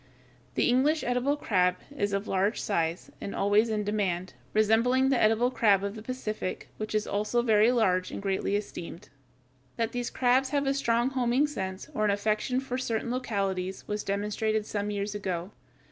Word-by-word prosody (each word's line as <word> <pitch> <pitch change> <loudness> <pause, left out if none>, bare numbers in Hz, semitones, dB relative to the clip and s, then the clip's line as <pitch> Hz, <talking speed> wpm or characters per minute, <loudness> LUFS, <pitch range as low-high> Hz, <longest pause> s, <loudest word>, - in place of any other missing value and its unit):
The - - +2
English 280 +6 +3
edible 250 +4 +1
crab 180 -8 +2 0.2
is 205 -6 0
of 200 +1 -2
large 195 +3 +1
size 170 -4 -1
and 200 - -5
always 205 +3 +3
in 215 -1 0
demand, 190 -4 -1 0.2
resembling 230 +5 +3
the 265 -3 +2
edible 225 +3 +3
crab 205 -6 +3
of 200 0 -2
the 220 - -8
Pacific, 215 -5 -4
which 215 0 -4
is 215 - +1
also 215 +4 0
very 220 0 +5
large 185 -7 +2
and - - -6
greatly 195 0 -1
esteemed. 195 -2 -6 0.7
That 230 0 0
these 245 0 -2
crabs 260 +1 +2
have 285 0 0
a 275 - +2
strong 240 -2 +1
homing 255 +1 +2
sense, 190 -10 -5
or 215 - -1
an 210 - +3
affection 215 +5 0
for 260 -1 -3
certain 235 -1 -2
localities, 195 -7 -2
was 210 0 -2
demonstrated 210 +2 -1
some 205 -1 -3
years 205 0 -2
ago. 185 -2 -3
215 Hz, 175 wpm, -28 LUFS, 200-245 Hz, 0.7 s, very